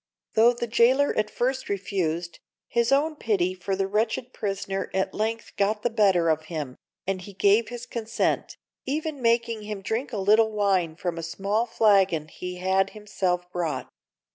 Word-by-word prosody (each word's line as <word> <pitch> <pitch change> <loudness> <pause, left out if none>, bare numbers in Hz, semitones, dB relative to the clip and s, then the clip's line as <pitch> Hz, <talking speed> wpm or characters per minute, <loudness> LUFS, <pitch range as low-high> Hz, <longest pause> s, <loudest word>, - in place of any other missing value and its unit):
Though 230 +2 +6
the 240 0 -3
jailer 240 +5 +3
at 215 0 0
first 260 +3 -1
refused, 180 -4 -2 0.3
his 235 +1 +1
own 300 +3 +3
pity 195 -9 0
for 190 +1 -3
the 195 0 0
wretched 220 +5 -1
prisoner 195 -1 -3
at 190 - 0
length 225 +2 -3
got 210 +1 +1
the 240 - +1
better 195 -6 +3
of 155 0 0
him, 150 -6 -5 0.3
and 190 -1 -2
he 200 +2 -10
gave 205 +3 +3
his 240 0 -7
consent, 230 -1 -2 0.3
even 300 0 -2
making 230 -1 +1
him 210 -2 -6
drink 230 +8 -2
a 220 - -3
little 215 +3 +4
wine 195 -6 +1
from 175 -1 -3
a - - -3
small 200 +7 -1
flagon 195 -8 +3
he 180 +2 -6
had 190 +1 +1
himself 185 -4 -1
brought. 160 -7 -2
205 Hz, 165 wpm, -26 LUFS, 185-230 Hz, 0.3 s, Though